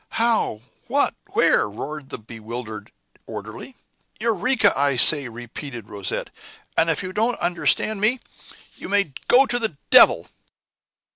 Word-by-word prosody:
"How? 225 - +1 0.3
What? - - +1 0.2
Where?" - - +3
roared 145 +6 -7
the - - -6
bewildered 110 -1 -9 0.4
orderly. 110 - -9 0.4
"Eureka! 225 0 +2
I 140 0 +1
say," 140 +2 +6
repeated 120 0 -9
Rosette; 100 -2 -4 0.4
"and 165 0 +2
if 165 +4 -1
you 185 0 -6
don't 230 +4 0
understand 180 +4 +1
me, 235 +5 +2 0.6
you - - -9
may 200 -7 0
go 265 +3 +6
to 245 -1 -1
the 220 -11 -2
devil!" - - +6
155 Hz, 130 wpm, -22 LUFS, -, 0.6 s, say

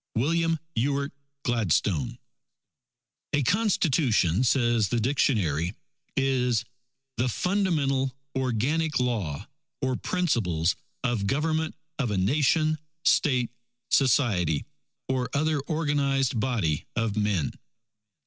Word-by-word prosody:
_ - - +3
WILLIAM 165 +4 +2 0.2
EWART 140 +4 0 0.3
GLADSTONE 100 - +1 1.2
"A 145 - +2
Constitution," 135 - +2
says 120 -4 +3
the 120 - +1
dictionary, 105 - +1 0.4
is 125 -4 +1 0.5
"the 125 +2 +1
fundamental 145 - +1 0.2
organic 130 +5 0
law 105 -7 -2 0.3
or 130 -2 0
principles 105 - 0 0.3
of 115 -5 0
Government 155 +5 0 0.2
of 130 -5 0
a 105 - -1
Nation, 155 - +2 0.3
State, 125 -6 +3 0.4
Society, 105 - +2 0.4
or 130 -1 -1
other 155 +1 +1
organized 140 -6 +1
body 105 - 0
of 115 -3 0
men. 105 -7 0
125 Hz, 95 wpm, -27 LUFS, 105-145 Hz, 1.2 s, _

